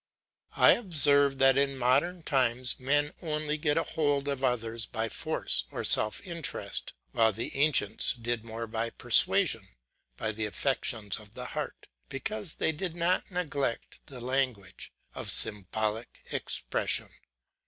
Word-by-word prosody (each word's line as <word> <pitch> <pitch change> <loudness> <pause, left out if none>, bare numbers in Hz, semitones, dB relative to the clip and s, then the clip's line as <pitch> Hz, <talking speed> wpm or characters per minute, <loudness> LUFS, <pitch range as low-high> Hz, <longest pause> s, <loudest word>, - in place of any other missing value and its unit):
I - - +7
observe 145 - +4
that 135 0 +4
in 140 -1 0
modern 140 +8 0
times 125 -3 +1
men 145 +3 0
only 155 -2 -3
get 150 0 0
a 165 - +1
hold 145 -3 -1
over 140 -2 -3
others 115 -3 -3
by 110 0 -3
force - - -2
or - - -5
self 105 - +5
interest, 170 -3 -4 0.2
while 115 -1 +3
the 115 +3 -5
ancients 140 -7 +3
did 120 -1 -4
more 115 0 -6
by 115 +1 -2
persuasion, - - +3 0.5
by 110 - -2
the 110 0 -3
affections 110 -4 -2
of 105 +1 -16
the 125 - -5
heart; - - -6 0.2
because 200 +4 -4
they - - 0
did 165 +2 -5
not 175 +2 0
neglect 145 -9 -3
the 130 -3 -10
language; 125 -6 -3 0.2
of - - -5
symbolic 110 +2 +2
expression. - - -2
135 Hz, 140 wpm, -28 LUFS, 115-150 Hz, 0.5 s, I